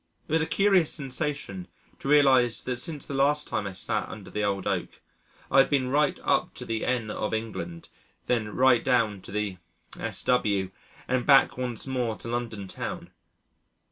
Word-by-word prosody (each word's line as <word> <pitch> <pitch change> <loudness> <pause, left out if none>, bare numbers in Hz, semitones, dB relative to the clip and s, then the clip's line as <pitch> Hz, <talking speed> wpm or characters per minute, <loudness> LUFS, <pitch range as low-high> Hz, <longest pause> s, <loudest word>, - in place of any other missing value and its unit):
It - - -10
was 160 +1 +3
a 160 - -1
curious 195 -5 +3
sensation 135 - -3 0.3
to - - -7
realise 135 -5 +4
that 125 -1 -2
since 150 +2 -3
the - - -6
last 145 +2 +2
time 100 - -2
I 95 - -6
sat 95 - -2
under - - -9
the 105 - -2
old 100 -2 -1
oak - - -2 0.5
I 135 - +6
had 135 - +5
been 135 -3 +1
right 150 +1 +2
up - - +1
to - - -7
the 110 -1 -2
N. 120 -4 0
of 110 +1 -2
England, 90 -7 -5 0.4
then 115 -4 0
right 125 -2 +4
down 115 -6 +1
to - - -11
the 105 -2 -2 0.4
S.W., 100 -6 0 0.4
and 130 -1 +1
back 135 0 +5
once 125 -3 -2
more 125 -4 -1
to - - -9
London 115 -4 -3
town. - - -6
125 Hz, 175 wpm, -27 LUFS, 105-140 Hz, 0.5 s, I